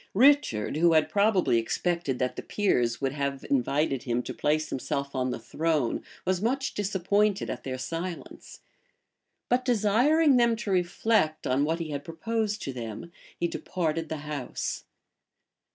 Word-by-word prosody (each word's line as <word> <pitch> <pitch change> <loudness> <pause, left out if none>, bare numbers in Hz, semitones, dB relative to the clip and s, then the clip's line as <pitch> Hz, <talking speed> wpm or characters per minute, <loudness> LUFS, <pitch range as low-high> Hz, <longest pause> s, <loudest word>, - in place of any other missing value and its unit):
Richard, 245 - +4
who 170 +1 +4
had 155 -1 +3
probably 200 - +3
expected 170 +3 -1
that 125 0 -1
the - - -5
peers 120 - 0
would 135 -1 0
have 140 -1 -3
invited 140 0 +1
him 120 0 -1
to - - -5
place 155 +1 0
himself 140 +1 -3
on 130 -1 0
the - - -2
throne, 155 -6 -1 0.2
was 185 0 0
much 265 +5 0
disappointed 200 +1 +1
at - - -6
their 130 -1 -4
silence; 165 +6 -6 0.9
but 250 +1 +2
desiring 250 +6 +4
them 235 -1 +4
to 220 -3 -4
reflect 180 -2 +1
on 135 +3 +2
what 160 +2 0
he 165 -3 -5
had 145 -1 -4
proposed 210 +6 -2
to 135 - -4
them, 115 +6 -7 0.3
he 170 - +1
departed 165 -2 -2
the 160 - -3
house. 145 -4 -4
165 Hz, 150 wpm, -27 LUFS, 140-205 Hz, 0.9 s, Richard